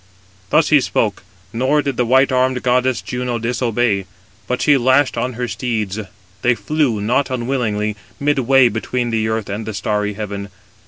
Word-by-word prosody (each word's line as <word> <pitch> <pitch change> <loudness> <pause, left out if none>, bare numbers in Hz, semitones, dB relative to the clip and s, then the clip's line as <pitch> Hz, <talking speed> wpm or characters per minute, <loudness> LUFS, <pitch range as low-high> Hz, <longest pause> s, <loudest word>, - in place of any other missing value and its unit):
Thus 155 +5 +3
he 150 -3 +5
spoke: 105 -5 -1 0.3
nor 135 +5 +1
did 140 -2 -2
the 120 -1 0
white 130 +3 +4
armed 130 0 +1
goddess 125 0 +1
Juno 125 -1 -3
disobey, 115 -3 0 0.4
but 125 - -1
she 145 - +4
lashed 130 +2 +3
on 130 - -2
her 125 +1 -3
steeds. 110 -5 -2 0.4
They 125 0 +3
flew, 145 -6 0
not 120 +6 +1
unwillingly, 120 -5 -1 0.2
midway 135 -2 +4
between 120 +2 -2
the 110 -1 0
earth 110 -2 -2
and 105 +2 -5
the 110 - -4
starry 105 0 -1
heaven. 100 -1 -5
120 Hz, 160 wpm, -18 LUFS, 110-130 Hz, 0.4 s, he